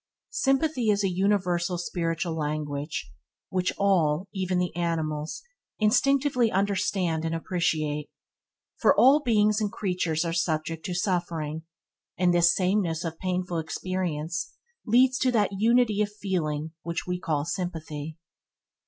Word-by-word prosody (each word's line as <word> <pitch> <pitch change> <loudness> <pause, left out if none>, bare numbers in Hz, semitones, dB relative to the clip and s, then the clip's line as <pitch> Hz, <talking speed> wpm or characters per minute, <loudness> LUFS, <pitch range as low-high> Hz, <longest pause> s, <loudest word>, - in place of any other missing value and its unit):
Sympathy 270 -3 +1
is 205 0 +2
a 195 - +1
universal 180 -2 +1
spiritual 170 -1 -2
language 150 - -3 0.4
which 185 -1 0
all, 180 -3 +2
even 185 -2 -1
the 180 -2 -1
animals, 160 - -2 0.3
instinctively 250 +2 +3
understand 190 -4 0
and 165 0 -1
appreciate, 155 -3 -1 0.7
for - - +4
all 275 +4 +7
beings 215 -4 +3
and 205 -1 0
creatures 180 -4 -1
are 165 - -1
subject 160 -1 -1
to 180 - -3
suffering, 165 -4 -2 0.5
and 175 0 +3
this 175 0 +5
sameness 185 -3 +1
of 165 -1 -5
painful 180 -2 -1
experience 165 0 -3 0.3
leads 255 +3 +4
to 255 - +2
that 210 -5 +2
unity 225 -1 +3
of 210 - +1
feeling 160 -7 -2
which 170 +1 -4
we 180 0 -2
call 150 -5 -1
sympathy. 160 -3 -4
180 Hz, 125 wpm, -27 LUFS, 160-200 Hz, 0.7 s, all